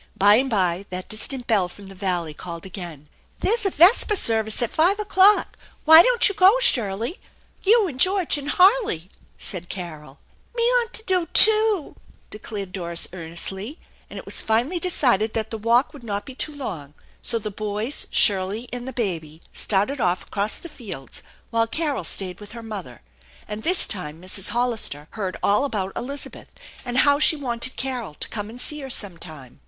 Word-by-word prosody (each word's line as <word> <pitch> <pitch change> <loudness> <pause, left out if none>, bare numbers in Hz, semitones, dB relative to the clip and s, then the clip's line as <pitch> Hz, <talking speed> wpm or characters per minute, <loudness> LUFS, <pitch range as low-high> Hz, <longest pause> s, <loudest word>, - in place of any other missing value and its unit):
By 205 +1 +6
and 265 +2 0
by 190 -3 -1
that 185 0 -6
distant 245 +4 -3
bell 200 -6 +1
from 200 +2 -14
the 195 - -12
valley 180 -5 -3
called 170 +2 -9
again. 170 -6 -8 0.2
" - - -36
There's 455 0 +2
a - - +1
vesper 385 +5 +4
service 220 - +4
at 235 - -3
five 365 +6 +2
o'clock. 405 0 +3 0.3
Why 320 +1 +10
don't - - +4
you 405 - -1
go, 390 +4 +5
Shirley? 235 - +2 0.4
You 435 +2 +4
and 265 -6 -8
George 370 +1 +3
and 290 -1 -5
Harley," 365 - +2 0.3
said 175 -2 -2
Carol. 155 -6 -8 0.2
" - - -35
Me 470 -1 +3
'ant 460 -1 -7
do 365 -3 0
too! 430 -5 +5 0.2
" - - -34
declared 205 -3 -7
Doris 170 -3 -3
earnestly, 190 - -6 0.3
and - - -10
it - - -9
was - - -1
finally 245 +11 0
decided 245 - +1
that 220 0 -3
the 225 - -5
walk 235 +7 +2
would 280 -5 -13
not 205 -3 -4
be 265 - -9
too 295 +3 -4
long; 160 - -7 0.3
so 230 - +1
the 215 -1 -5
boys, 215 +5 -2
Shirley 200 +4 +2
and 245 0 -5
the 265 - -6
baby 165 -9 -3
started 215 +7 +1
off 180 -1 0
across 205 +1 -2
the - - -9
fields, 225 - -8 0.3
while 230 0 +1
Carol 295 - -2
stayed 180 +1 -4
with 205 0 -11
her 230 -1 -9
mother. 190 - -8 0.4
And 210 +1 -6
this 360 +8 +5
time 160 -5 -2
Mrs. 185 +1 -1
Hollister 220 -10 -2
heard 195 -4 -5
all 205 +6 +2
about 200 -8 -3
Elizabeth 275 +3 -7 0.4
and 245 0 -3
how 285 +1 +4
she 310 - +5
wanted 255 -3 -3
Carol 245 - -4
to - - -4
come 205 -1 -5
and 235 +3 -11
see 300 +4 0
her 270 -2 -8
sometime. 165 - -7
225 Hz, 185 wpm, -22 LUFS, 190-290 Hz, 0.4 s, Why